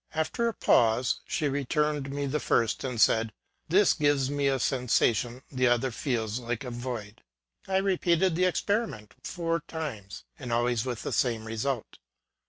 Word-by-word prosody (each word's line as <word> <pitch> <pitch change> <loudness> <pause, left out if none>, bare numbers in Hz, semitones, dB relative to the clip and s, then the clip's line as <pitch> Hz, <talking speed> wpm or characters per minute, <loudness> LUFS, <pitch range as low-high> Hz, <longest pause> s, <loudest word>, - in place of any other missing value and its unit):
After 160 +10 0
a 230 - -1
pause, 120 +2 +3
she 155 - 0
returned 145 +1 0
me 140 +1 -2
the 145 +2 -1
first, 115 -6 +1
and 125 -3 -3
said, 110 +1 +4 0.2
" - - -46
This 190 +4 +5
gives 145 -3 +1
me 145 -1 +1
a 135 -1 +2
sensation, 125 -1 +1
the 130 -2 +2
other 120 +2 +2
feels 115 -2 -2
like 120 +1 -3
a 125 - -5
void." 120 -4 -6 0.5
I 190 0 +1
repeated 185 -2 +2
the 180 +2 +2
experiment 185 - -1
four 170 -1 -1
times, 120 - -6 0.2
and 125 -2 -6
always 120 0 +1
with 125 -3 -4
the - - -3
same 115 -3 0
result. 115 +2 -3
130 Hz, 165 wpm, -28 LUFS, 115-150 Hz, 0.5 s, This